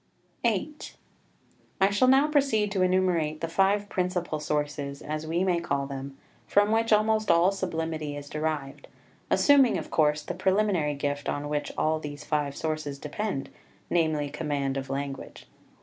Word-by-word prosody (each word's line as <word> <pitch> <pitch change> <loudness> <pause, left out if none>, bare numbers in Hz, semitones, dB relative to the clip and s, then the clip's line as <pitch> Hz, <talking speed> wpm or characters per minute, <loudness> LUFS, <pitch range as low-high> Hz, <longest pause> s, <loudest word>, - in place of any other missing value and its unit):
VIII 235 +6 0 1.1
I 195 +1 +4
shall 205 +6 +3
now 270 +3 +5
proceed 270 -9 +2
to 195 -2 0
enumerate 180 -4 +1
the 165 - -2
five 195 +4 +2
principal 180 -4 -2
sources, 145 -2 -2
as 155 +1 -4
we 170 +3 0
may 180 -2 +2
call 140 -4 -1
them, 135 0 -7 0.3
from 205 +1 +3
which 225 +1 +1
almost 215 0 +3
all 170 +3 +5
sublimity 160 -6 -3
is 145 0 -8
derived, 150 -2 -4 0.4
assuming, 280 -4 +5
of - - -6
course, 150 -1 +2
the - - -4
preliminary 190 -6 +1
gift 145 0 -2
on 145 +1 -3
which 150 0 -2
all 155 0 +1
these 145 -1 -7
five 145 -2 -1
sources 155 -3 -3
depend, 150 +1 -4 0.4
namely, 155 -4 +1
command 145 -3 -2
of 135 -1 -4
language. 140 0 -5
160 Hz, 150 wpm, -27 LUFS, 145-195 Hz, 1.1 s, now